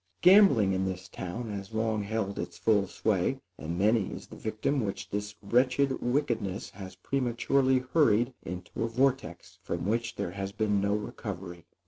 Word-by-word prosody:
Gambling, 180 - +7
in 95 0 0
this 95 -1 -4
town, 110 +5 -5
has 100 +1 -6
long 110 -1 0
held 100 -1 -2
its - - -5
full 105 -3 +2
sway, - - 0 0.2
and 85 +2 -4
many 105 +1 +3
is - - -7
the - - -12
victim 110 +5 -1
which 100 -1 -4
this 105 +1 -3
wretched 130 +5 +2
wickedness 120 -6 -1
has 95 -1 -9
prematurely 130 +4 +1
hurried 125 -5 +4
into 90 +5 -5
a - - +1
vortex, 125 -7 -1
from - - -3
which 115 +3 -1
there 85 - -3
has 95 0 -4
been 105 -1 +1
no 100 +1 +1
recovery. 95 -6 -6
110 Hz, 160 wpm, -29 LUFS, 95-120 Hz, 0.2 s, Gambling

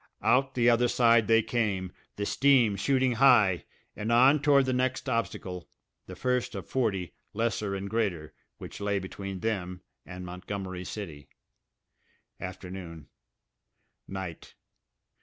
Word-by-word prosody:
Out 135 +1 +2
the 120 -1 +3
other 120 0 +4
side 115 -2 +4
they 115 0 +4
came, 100 -7 -1 0.2
the 100 - -3
steam 125 -5 +3
shooting 130 +4 +1
high, 115 -7 +4 0.3
and 110 +2 -3
on 130 +5 +5
toward 140 -2 +4
the 130 - 0
next 130 +2 -1
obstacle, 95 -7 -3 0.4
the - - -8
first 125 -1 -1
of - - -5
forty, 100 -9 -1 0.2
lesser 105 -2 -1
and 100 +1 -4
greater, 100 -8 -2 0.2
which - - -9
lay 100 0 0
between 95 0 -6
them 90 -5 -3 0.2
and 90 0 -8
Montgomery 95 0 -6
City. 80 -9 -7 1.1
Afternoon... 90 -3 -8 1.0
night. 95 -4 -7
105 Hz, 125 wpm, -28 LUFS, 95-125 Hz, 1.1 s, on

